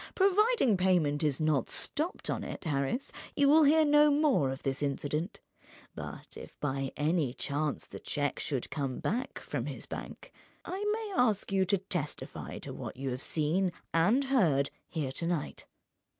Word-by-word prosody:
Providing 395 - +4
payment 175 -6 +2
is 150 -4 +1
not 155 -5 +1
stopped 325 +5 -2
on - - -2
it, - - -6
Harris, 155 - -1 0.2
you 285 - +4
will 305 +2 +7
hear 310 +2 +5
no 295 0 +6
more 285 - +3
of 135 0 -5
this 135 +1 -2
incident. 145 - -2 0.5
But - - -8
if - - -11
by 135 -2 -2
any 150 -4 +1
chance 145 +1 -2
the - - -9
cheque 145 -1 -2
should 135 -4 -3
come 135 -4 -2
back 245 +6 -2
from - - -4
his - - -6
bank—I 405 -5 -8
may 435 -2 -3
ask 215 - +2
you 190 -1 +3
to 200 +2 +2
testify 175 -6 -4
to - - -7
what - - -7
you 135 0 -3
have 125 +1 -4
seen 170 +6 +1 0.2
and 200 +12 +4
heard 175 - +2 0.2
here 145 -5 -2
to 165 +5 -3
night." 170 -4 -3
170 Hz, 165 wpm, -31 LUFS, -, 0.5 s, will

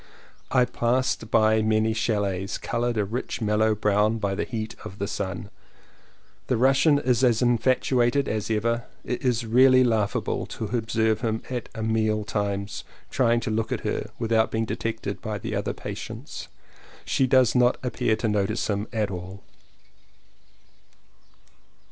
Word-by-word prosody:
I 125 -1 +4
passed 125 -2 0
by 110 -1 +4
many 110 0 +2
chalets 100 -4 -1
coloured 120 0 -2
a 105 - +1
rich 115 +6 -4
mellow 110 0 +2
brown 105 +1 +2
by 100 -3 -1
the - - -2
heat 110 -2 -5
of 95 - -9
the 100 - -2
sun. 100 -1 -4 1.0
The 125 - +1
Russian 135 +4 +4
is 125 -3 +1
as 120 -1 +3
infatuated 125 +2 +2
as 110 -1 -2
ever; 115 +2 0 0.2
it 125 - -3
is 120 -2 +1
really 130 +3 +6
laughable 110 -4 0
to 110 +2 -3
observe 110 -1 0
him 110 -2 -1
at 125 -3 -4 0.2
meal 110 -1 +1
times 100 -1 -3 0.3
trying 120 -3 +2
to 110 - -3
look 110 +1 -1
at - - -1
her - - -3
without 110 0 +2
being 110 0 -1
detected 110 -2 -4
by 110 -1 -3
the 110 +2 -5
other 100 - -1
patients. - - -7 0.6
She 130 - +1
does 130 -1 +4
not 125 0 +3
appear 125 -2 0
to 115 - -2
notice 105 +1 0
him 105 0 -1
at 110 -4 -1
all. 95 +2 -7
110 Hz, 150 wpm, -25 LUFS, 105-120 Hz, 1.0 s, really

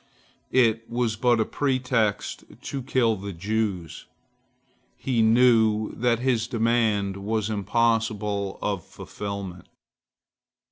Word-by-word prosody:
It 115 -3 +3
was 120 -2 0
but 120 +1 +2
a 110 - +2
pretext 130 -6 -1 0.2
to 140 - -5
kill 120 -3 +1
the 100 0 -6
Jews. 100 -2 -3 0.9
He 125 -4 0
knew 110 -2 +4
that 120 0 +1
his 120 -2 0
demand 110 -4 +1
was 110 +2 -2
impossible 105 -2 0
of 100 -4 -1
fulfilment. 100 -3 -7
110 Hz, 100 wpm, -25 LUFS, 100-120 Hz, 0.9 s, knew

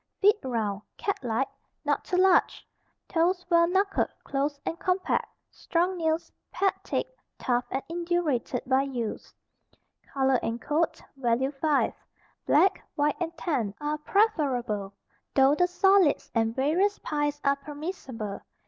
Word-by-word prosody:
Feet 415 +2 +5
round, 215 -5 -2 0.2
cat 400 - -1
like, 245 +3 0 0.4
not - - 0
too 360 - -1
large, 370 -1 +3 0.4
toes 360 +2 +1
well 335 0 +6
knuckled, 390 +2 +1 0.2
close 280 +1 -2
and 335 - -3
compact, 370 0 0 0.2
strong 350 +2 0
nails, 320 -1 -1 0.2
pad 390 -1 +2
thick, - - -1 0.3
tough 245 -1 0
and 265 - -2
indurated 335 -8 -1
by 260 +1 +3
use. 250 -5 -4 0.8
Color 265 -2 +2
and 230 +1 -2
coat 315 +5 -1
(value 255 +1 +1
5). 290 0 +1 0.5
Black, 385 - +4
white 295 -1 +1
and 335 -1 -3
tan 260 - -1
are 300 +1 -2
preferable, 260 - 0 0.4
though 270 +1 +6
the 355 +4 +3
solids 380 -2 +3
and 225 0 +1
various 345 +10 +2
pies 295 -1 -2
are 280 0 +3
permissible. 280 - -6
295 Hz, 130 wpm, -27 LUFS, 260-350 Hz, 0.8 s, well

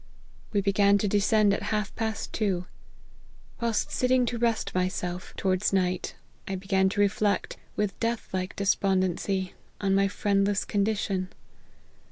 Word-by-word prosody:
We 205 - +2
began 200 +1 +4
to 205 - 0
descend 205 +1 +3
at - - -1
half 210 -1 -1
past 220 -1 -3
two. 190 -5 0 0.9
Whilst 230 -2 0
sitting 255 0 +2
to 235 0 -3
rest 230 -1 0
myself, 180 -1 -2
towards 185 +1 +1
night, 185 -2 0 0.3
I 195 - -2
began 190 0 +1
to 205 - -3
reflect, 205 0 +1 0.2
with 210 -2 -1
death 230 0 -1
like 185 0 -2
despon 195 -1 +2
dency, 185 +1 -1 0.3
on 195 -1 +1
my 195 0 +4
friendless 200 0 +1
condition. 200 -3 0
200 Hz, 140 wpm, -27 LUFS, 190-210 Hz, 0.9 s, began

